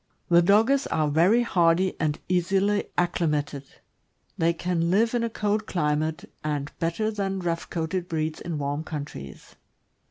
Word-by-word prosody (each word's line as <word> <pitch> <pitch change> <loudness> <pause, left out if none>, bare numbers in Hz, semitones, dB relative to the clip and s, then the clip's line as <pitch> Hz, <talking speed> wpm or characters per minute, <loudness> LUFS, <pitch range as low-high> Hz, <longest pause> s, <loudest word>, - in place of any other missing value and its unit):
The 170 0 +6
Dogges 220 +9 +3
are 155 -2 0
very 180 +11 +4
hardy 180 -3 +2
and 155 -2 0
easily 195 +3 +1
acclimated; 150 -5 0 0.7
they 165 +1 +2
can 170 0 -1
live 225 +6 +3
in 240 -1 +1
a 230 - 0
cold 210 -1 -1
climate, 155 -2 -1 0.2
and 145 -1 -2
bet 165 0 -1
ter 220 0 0
than 195 -2 -2
rough 170 -2 -3
coated 170 +2 -2
breeds 155 -1 -2
in 170 -3 -4
warm 145 +1 -2
countries. 145 - -8
170 Hz, 150 wpm, -26 LUFS, 155-195 Hz, 0.7 s, The